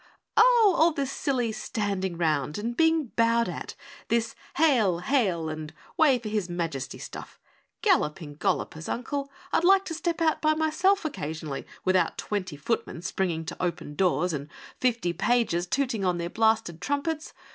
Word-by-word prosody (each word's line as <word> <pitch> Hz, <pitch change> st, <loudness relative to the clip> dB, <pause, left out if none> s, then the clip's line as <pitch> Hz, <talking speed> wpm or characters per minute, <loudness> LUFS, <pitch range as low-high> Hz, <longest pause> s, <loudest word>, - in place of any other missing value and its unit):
"Oh, 470 Hz, -5 st, +6 dB
all 330 Hz, +1 st, +5 dB
this 275 Hz, -2 st, -2 dB
silly 250 Hz, -6 st, 0 dB
standing 200 Hz, -5 st, -2 dB
round 150 Hz, -3 st, 0 dB
and 230 Hz, +3 st, -3 dB
being 320 Hz, -2 st, +3 dB
bowed 230 Hz, 0 st, +3 dB
at, -, -, -6 dB, 0.3 s
this 230 Hz, -1 st, 0 dB, 0.2 s
'Hail! 245 Hz, -, +4 dB
Hail! 185 Hz, -, +1 dB
and 155 Hz, -1 st, -5 dB, 0.2 s
Way 290 Hz, -5 st, +5 dB
for 235 Hz, -2 st, -7 dB
His 210 Hz, -4 st, -1 dB
Majesty!' 165 Hz, -6 st, -3 dB
stuff. -, -, -9 dB, 0.4 s
Galloping 155 Hz, -, +1 dB
Gollopers, 160 Hz, +1 st, -1 dB
Uncle, 275 Hz, +3 st, -3 dB, 0.2 s
I'd -, -, +3 dB
like 390 Hz, +2 st, +5 dB
to 335 Hz, -, -4 dB
step 335 Hz, +1 st, -2 dB
out 320 Hz, -1 st, +2 dB
by 310 Hz, 0 st, +3 dB
myself 330 Hz, +5 st, +2 dB
occasionally 155 Hz, -, -4 dB, 0.2 s
without 185 Hz, 0 st, +2 dB
twenty 185 Hz, -7 st, -3 dB
footmen 170 Hz, +1 st, -3 dB
springing 175 Hz, -3 st, -1 dB
to 160 Hz, -, -5 dB
open 170 Hz, -4 st, -3 dB
doors 180 Hz, 0 st, +1 dB
and 145 Hz, 0 st, -4 dB, 0.3 s
fifty 230 Hz, -9 st, +1 dB
pages 195 Hz, -2 st, +1 dB
tooting 245 Hz, -3 st, 0 dB
on 180 Hz, -2 st, +1 dB
their 170 Hz, 0 st, -4 dB
blasted 220 Hz, -7 st, +1 dB
trumpets. 295 Hz, -, -2 dB
220 Hz, 155 wpm, -27 LUFS, 170-285 Hz, 0.4 s, Oh